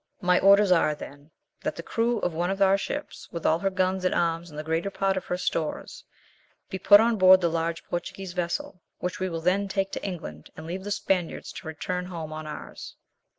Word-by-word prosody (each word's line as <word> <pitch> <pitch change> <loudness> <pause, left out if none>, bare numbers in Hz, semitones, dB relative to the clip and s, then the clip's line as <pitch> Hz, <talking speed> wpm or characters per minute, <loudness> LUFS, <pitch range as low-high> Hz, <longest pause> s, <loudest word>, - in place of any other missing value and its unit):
My 180 -1 +4
orders 200 0 +6
are, 165 -4 +4
then, 145 0 -11 0.3
that - - -2
the - - -7
crew 235 +1 0
of 180 - -1
one 175 +2 -1
of 195 +1 -2
our 195 0 +5
ships, 290 +9 -5
with 170 - -6
all 160 +1 +3
her 195 - +1
guns 185 0 0
and 185 - +1
arms 170 0 0
and 150 - -11
the 150 - -4
greater 160 +4 -1
part 195 0 0
of 190 - -3
her 180 - -2
stores, 165 -3 -3 0.7
be 190 - -3
put 205 +2 +8
on 225 0 +3
board 185 -1 +8
the 170 -2 +1
large 165 0 -2
Portuguese 180 +1 -5
vessel, 180 +5 -3 0.2
which 180 +2 -4
we 185 0 -1
will 165 -1 -4
then 190 +4 +1
take 195 0 -1
to - - -5
England, 155 - -6
and 160 - -8
leave 185 +4 -5
the - - -4
Spaniards 190 -4 -1
to - - -9
return 180 +3 -3
home 165 -4 -6
on 155 0 -6
ours." 150 - -8
180 Hz, 220 wpm, -26 LUFS, 165-195 Hz, 0.7 s, put